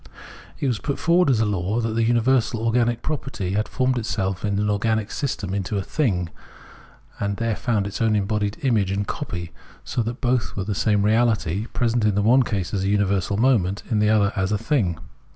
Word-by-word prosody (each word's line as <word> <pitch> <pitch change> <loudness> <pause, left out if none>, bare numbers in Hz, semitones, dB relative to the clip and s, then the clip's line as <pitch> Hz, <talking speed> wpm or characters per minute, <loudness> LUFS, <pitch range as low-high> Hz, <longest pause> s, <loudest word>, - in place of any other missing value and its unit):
It - - -2
was 120 -5 0
put 140 - -3
forward 170 -1 +3
as 120 -4 +3
a - - +3
law, 100 +2 -1
that 115 -1 -1
the 115 - 0
universal 120 0 +2
organic 120 +1 +1
property 135 -11 -3
had 105 +2 0
formed 130 -1 0
itself 95 -4 -2
in 100 -2 0
an 105 +1 0
organic 110 +1 0
system 110 -9 -3
into 100 +1 -2
a 100 - -1
thing 95 - -1 0.9
and 100 -1 -2
there 115 -2 -1
found 110 -5 0
its 100 +2 -5
own 110 -1 +3
embodied 105 0 -1
image 110 -8 +2
and 100 +1 -1
copy, 90 - -5 0.3
so 120 - -2
that 120 +3 -4
both 125 -3 0
were 95 - -2
the 105 +2 -2
same 105 +1 +1
reahty, 110 -2 +1
present, 120 -1 +1
in 105 -2 +2
the 100 - +1
one 125 +5 +5
case, 100 -7 -2
as 95 -2 0
universal 100 -1 +1
moment, 105 -6 +2
in 110 - +2
the 105 0 +3
other, 105 -1 +3
as 95 0 0
thing. 105 - 0
105 Hz, 200 wpm, -23 LUFS, 100-120 Hz, 0.9 s, one